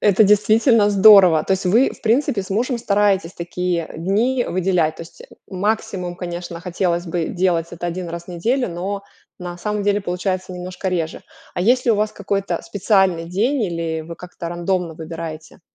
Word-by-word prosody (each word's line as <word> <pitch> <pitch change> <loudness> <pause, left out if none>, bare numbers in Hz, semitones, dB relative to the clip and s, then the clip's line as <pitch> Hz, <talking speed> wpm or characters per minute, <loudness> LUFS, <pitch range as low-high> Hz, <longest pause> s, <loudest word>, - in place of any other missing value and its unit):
Это 205 +1 +4
действительно 215 +2 +4
здорово. 195 -6 +7
То - - 0
есть 190 0 -1
вы, 225 +9 +4
в - - -13
принципе, 230 -2 +1
с 190 - -12
мужем 240 +6 0
стараетесь 200 -5 +1
такие 175 -1 -3
дни 225 +9 +1
выделять. 180 -4 0
То - - -7
есть, 165 - -14
э, - - -13 0.2
максимум, 190 -2 -2
конечно, 175 -1 -6
хотелось 175 -1 -1
бы 165 -1 -2
делать 175 -3 0
это 175 0 -5
1 175 0 -4
раз 170 0 -6
в - - -29
неделю, 230 +10 -1
но 190 +3 -4 0.4
на 175 -1 -6
самом 210 +3 -3
деле 205 0 +1
получается 185 0 -3
немножко 180 +1 -5
реже. 165 -3 -3 0.3
А - - -2
есть 250 +4 +3
ли 235 - +5
у - - +3
вас 210 +1 0
какой-то 195 -3 -2
специальный 185 -1 +1
день, 225 +10 0
или 165 -3 -2
вы 170 +2 -8
как-то 175 -1 -8
рандомно 175 0 -1
выбираете? 160 0 -8
185 Hz, 180 wpm, -20 LUFS, 170-205 Hz, 0.4 s, здорово